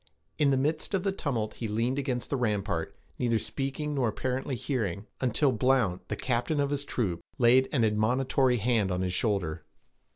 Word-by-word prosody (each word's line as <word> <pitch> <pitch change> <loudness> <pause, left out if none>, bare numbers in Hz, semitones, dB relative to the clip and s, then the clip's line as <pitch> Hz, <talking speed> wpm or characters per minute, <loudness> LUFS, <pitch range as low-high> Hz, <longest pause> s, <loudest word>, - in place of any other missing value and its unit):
In 145 - +4
the 135 - +3
midst 155 +8 0
of 185 - -1
the 195 - +1
tumult 125 - -2
he 115 - -4
leaned 115 +6 0
against 130 -3 -3
the - - +2
rampart, 105 -9 -1 0.2
neither 120 -2 +2
speaking 135 +7 -3
nor 135 -4 +1
apparently 130 +4 -2
hearing, 110 - -2
until 130 +3 +3
Blount, 120 -6 +1
the - - -2
captain 125 +4 -1
of 140 0 +1
his 145 -1 -1
troop, 95 -12 -1 0.2
laid 125 +2 +5
an 125 -5 +2
admonitory 125 +4 +2
hand 110 -3 +1
on 90 0 -1
his 90 -1 -1
shoulder. 90 -6 0
125 Hz, 175 wpm, -29 LUFS, 105-135 Hz, 0.2 s, laid